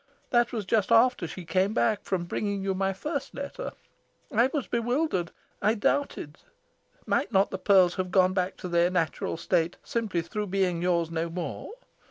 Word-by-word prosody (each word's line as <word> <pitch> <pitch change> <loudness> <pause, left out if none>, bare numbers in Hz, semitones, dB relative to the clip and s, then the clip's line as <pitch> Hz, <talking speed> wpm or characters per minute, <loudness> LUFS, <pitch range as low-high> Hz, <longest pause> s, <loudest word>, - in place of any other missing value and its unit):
That 240 -1 +3
was 220 -5 -3
just 210 +1 +1
after 230 -5 +4
she 180 +2 -8
came 185 +6 +1
back 215 -3 +2
from 185 -3 -1
bringing 200 +2 -2
you 195 0 0
my 195 +1 0
first 280 - -4
letter. 280 - -5 0.6
I 235 +3 +4
was 290 -5 -1
bewildered. 240 - 0 0.3
I 215 +3 +3
doubted. 205 - -1 0.7
Might - - 0
not 195 +1 +3
the 190 - -4
pearls 185 -3 +5
have 185 -1 -1
gone 185 0 +4
back 185 0 -1
to - - -6
their 170 0 +3
natural 165 -2 -1
state 170 0 0
simply 210 -8 -2
through 210 +5 -4
being 185 -3 0
yours 170 -2 +1
no 165 0 -2
more? 175 - -5
190 Hz, 175 wpm, -27 LUFS, 175-225 Hz, 0.7 s, pearls